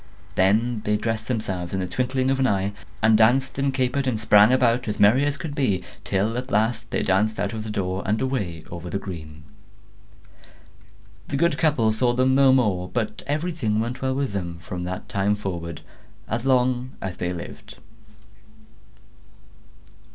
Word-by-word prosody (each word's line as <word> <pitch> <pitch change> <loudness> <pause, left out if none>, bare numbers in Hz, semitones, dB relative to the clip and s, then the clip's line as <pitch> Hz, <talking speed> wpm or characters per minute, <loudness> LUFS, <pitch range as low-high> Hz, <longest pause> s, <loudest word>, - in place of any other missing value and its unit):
Then 110 +5 +2
they 105 0 +1
dressed 110 0 -3
themselves 95 -7 -3
in - - -1
the 95 - -1
twinkling 130 +5 0
of 135 - 0
an 130 - +3
eye, 100 -1 0 0.3
and 110 0 +6
danced 130 +5 +3
and 135 0 +1
capered 130 +1 0
and 115 -4 0
sprang 105 0 +6
about, 125 -1 +2
as 105 -1 -3
merry 110 +7 +5
as 145 -1 -1
could 160 -4 -5
be; 125 -11 0 0.2
till 105 +5 0
at 130 +1 -7
last 110 0 0
they - - -1
danced 105 +3 +1
out 100 +1 -1
at 110 - -4
the 110 - -6
door, 95 -2 -2
and 105 +2 0
away 100 - -2
over 85 0 -6
the 100 - -2
green. 80 -6 -8 1.8
The 140 - -2
good 170 +4 +2
couple 130 -9 +2
saw 120 +2 +2
them 130 +1 +2
no 135 0 +6
more; 100 -9 +2
but 110 -3 -3
everything 145 -8 -1
went 120 +3 -3
well 130 0 0
with 140 -3 -1
them 85 -4 -4
from 90 0 -5
that 90 +1 -5
time 100 +1 +1
forward, 85 -5 -5 0.5
as 115 +3 -2
long 130 0 +2
as 95 -2 -5
they 90 0 -2
lived. 85 -1 -8
110 Hz, 175 wpm, -24 LUFS, 95-130 Hz, 1.8 s, and